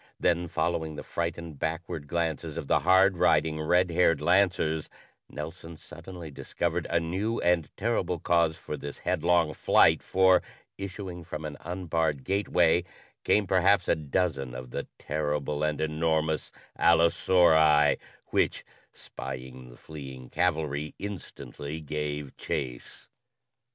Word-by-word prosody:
Then, 85 Hz, 0 st, +1 dB
following 80 Hz, -1 st, -1 dB
the -, -, -7 dB
frightened, 85 Hz, -3 st, -4 dB
backward 80 Hz, -1 st, -3 dB
glances 80 Hz, -2 st, -2 dB
of -, -, -4 dB
the -, -, +3 dB
hard 95 Hz, +1 st, +4 dB
riding, 80 Hz, -3 st, +2 dB
red 90 Hz, +3 st, +2 dB
haired 85 Hz, -2 st, +3 dB
lancers, 80 Hz, -2 st, +2 dB, 0.4 s
Nelson 80 Hz, +2 st, -8 dB
suddenly 85 Hz, -3 st, -10 dB
discovered 85 Hz, +4 st, -3 dB
a 85 Hz, -, +2 dB
new 95 Hz, +8 st, -2 dB
and 85 Hz, -3 st, +2 dB
terrible 95 Hz, -5 st, 0 dB
cause 85 Hz, -1 st, +2 dB
for 75 Hz, -, -6 dB
this 70 Hz, -1 st, -7 dB
headlong 85 Hz, -2 st, +1 dB
flight, -, -, +4 dB
for, 95 Hz, -1 st, +4 dB, 0.3 s
issuing 95 Hz, -2 st, -6 dB
from 75 Hz, 0 st, -6 dB
an 75 Hz, -1 st, -5 dB
unbarred 80 Hz, -5 st, -2 dB
gateway, 90 Hz, -3 st, +2 dB, 0.4 s
came 105 Hz, -, +3 dB
perhaps 95 Hz, +1 st, +3 dB
a -, -, +3 dB
dozen 70 Hz, -4 st, -2 dB
of 65 Hz, 0 st, -8 dB
the -, -, -4 dB
terrible 75 Hz, -1 st, -2 dB
and 75 Hz, -1 st, 0 dB
enormous 80 Hz, 0 st, 0 dB, 0.3 s
allosauri, 80 Hz, -3 st, +5 dB, 0.3 s
which, -, -, +1 dB, 0.3 s
spying 65 Hz, -1 st, -8 dB
the -, -, -14 dB
fleeing 65 Hz, -4 st, -10 dB
cavalry, 75 Hz, -3 st, -1 dB
instantly 80 Hz, -7 st, -7 dB
gave 75 Hz, -2 st, -4 dB
chase. 60 Hz, -2 st, -5 dB
80 Hz, 125 wpm, -28 LUFS, 75-90 Hz, 0.4 s, allosauri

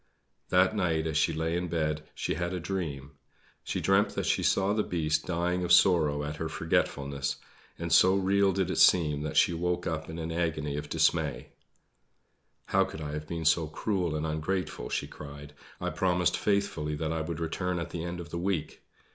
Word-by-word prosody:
That 95 Hz, +3 st, +4 dB
night, 85 Hz, -5 st, +1 dB
as 80 Hz, -2 st, -2 dB
she 80 Hz, -, +3 dB
lay 80 Hz, +1 st, -1 dB
in 90 Hz, +1 st, -1 dB
bed, 80 Hz, -2 st, -1 dB
she -, -, -2 dB
had 85 Hz, 0 st, -2 dB
a -, -, -2 dB
dream. 80 Hz, -7 st, -4 dB, 0.5 s
She -, -, -2 dB
dreamt 95 Hz, +2 st, +2 dB
that -, -, -1 dB
she -, -, +1 dB
saw 95 Hz, +1 st, +2 dB
the 110 Hz, -, +1 dB
Beast 80 Hz, -6 st, -1 dB
dying 90 Hz, +1 st, 0 dB
of 90 Hz, -, -1 dB
sorrow 80 Hz, -5 st, +5 dB
at 75 Hz, +1 st, -4 dB
her 80 Hz, 0 st, -3 dB
forgetfulness; 70 Hz, -3 st, -1 dB, 0.4 s
and -, -, -2 dB
so 95 Hz, +1 st, +6 dB
real 100 Hz, 0 st, +3 dB
did 95 Hz, -1 st, 0 dB
it -, -, -1 dB
seem 75 Hz, -5 st, +5 dB
that 75 Hz, 0 st, -3 dB
she -, -, +5 dB
woke 90 Hz, +1 st, -1 dB
up 80 Hz, -1 st, -3 dB
in 80 Hz, -, -6 dB
an 80 Hz, 0 st, -4 dB
agony 80 Hz, -4 st, -1 dB
of 75 Hz, 0 st, -5 dB
dismay. -, -, +1 dB, 1.2 s
"How -, -, +3 dB
could -, -, -7 dB
I 75 Hz, -2 st, -5 dB
have 75 Hz, 0 st, -5 dB
been 85 Hz, -1 st, -4 dB
so 80 Hz, +1 st, +3 dB
cruel 90 Hz, 0 st, -1 dB
and 75 Hz, +1 st, -2 dB
ungrateful," 80 Hz, +4 st, -2 dB
she -, -, -1 dB
cried. 75 Hz, 0 st, -10 dB, 0.3 s
"I -, -, -2 dB
promised 90 Hz, -1 st, +1 dB
faithfully 100 Hz, -7 st, 0 dB
that 80 Hz, +1 st, -2 dB
I 80 Hz, -, -1 dB
would 80 Hz, +1 st, -4 dB
return 90 Hz, +2 st, -2 dB
at 85 Hz, 0 st, -4 dB
the 85 Hz, -, -4 dB
end 85 Hz, 0 st, -4 dB
of 85 Hz, -1 st, -8 dB
the 85 Hz, -, -3 dB
week. 90 Hz, -3 st, -2 dB
80 Hz, 195 wpm, -29 LUFS, 75-90 Hz, 1.2 s, so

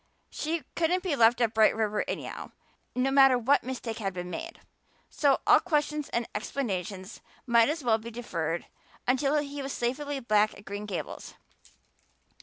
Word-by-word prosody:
She 320 Hz, +1 st, -2 dB
couldn't 345 Hz, +2 st, +1 dB
be 350 Hz, -6 st, 0 dB
left 235 Hz, 0 st, +4 dB
at 230 Hz, -2 st, +2 dB
Bright 220 Hz, -1 st, +5 dB
River 215 Hz, -1 st, 0 dB
anyhow, -, -, -5 dB, 0.4 s
no 255 Hz, +2 st, +1 dB
matter 270 Hz, -2 st, +6 dB
what 265 Hz, +4 st, +3 dB
mistake 240 Hz, -3 st, -5 dB
had 195 Hz, -3 st, -2 dB
been 180 Hz, 0 st, -5 dB
made, 165 Hz, -, -6 dB, 0.5 s
so 280 Hz, -2 st, +3 dB
all -, -, +7 dB
questions 300 Hz, -3 st, -1 dB
and 235 Hz, -1 st, -1 dB
explanations 200 Hz, -4 st, -4 dB, 0.2 s
might 235 Hz, 0 st, +4 dB
as 310 Hz, -1 st, -2 dB
well 225 Hz, -2 st, +3 dB
be 230 Hz, +2 st, -8 dB
deferred 175 Hz, -9 st, -3 dB, 0.4 s
until 275 Hz, +3 st, +2 dB
he 285 Hz, -1 st, -3 dB
was 275 Hz, 0 st, -4 dB
safely 275 Hz, +4 st, -2 dB
back 215 Hz, -3 st, +2 dB
at 205 Hz, -, -15 dB
Green 205 Hz, +1 st, -6 dB
Gables. 190 Hz, -4 st, -6 dB
240 Hz, 160 wpm, -28 LUFS, 215-285 Hz, 0.5 s, all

